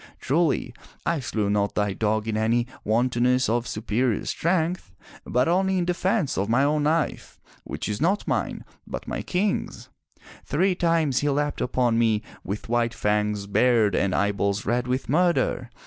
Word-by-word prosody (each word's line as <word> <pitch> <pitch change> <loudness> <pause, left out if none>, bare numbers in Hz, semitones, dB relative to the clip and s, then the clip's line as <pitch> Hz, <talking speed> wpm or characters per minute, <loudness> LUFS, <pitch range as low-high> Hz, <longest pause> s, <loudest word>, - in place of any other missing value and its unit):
Truly, 150 -4 0 0.3
I 170 -2 +1
slew 110 -5 -2
not 100 0 0
thy 105 -1 0
dog 110 +1 -1
in 110 - -1
any 115 +2 +1 0.2
wantonness 125 +3 +2
of 120 +2 0
superior 115 +1 -1
strength, 170 - -1 0.3
but 125 +1 +1
only 190 +2 +2
in 175 - 0
defense 180 - 0
of 100 +2 -1
my 125 +4 +3
own 150 +1 +1
life, 160 +1 -1 0.3
which - - -5
is 105 +4 -3
not 190 +6 +1
mine, - - -2 0.2
but - - -6
my - - -3
King's. 190 +2 -2 0.5
Three 185 +7 +1
times 165 -6 +1
he 145 - 0
leapt 145 +1 -1
upon 120 -2 +1
me 110 -2 +2 0.2
with 100 +3 -5
white 115 0 0
fangs 105 -1 0
bared 110 0 +3
and 95 0 +1
eyeballs 100 0 0
red 120 +2 0
with 130 +1 -1
murder. 170 -5 +1
125 Hz, 160 wpm, -25 LUFS, 110-160 Hz, 0.5 s, my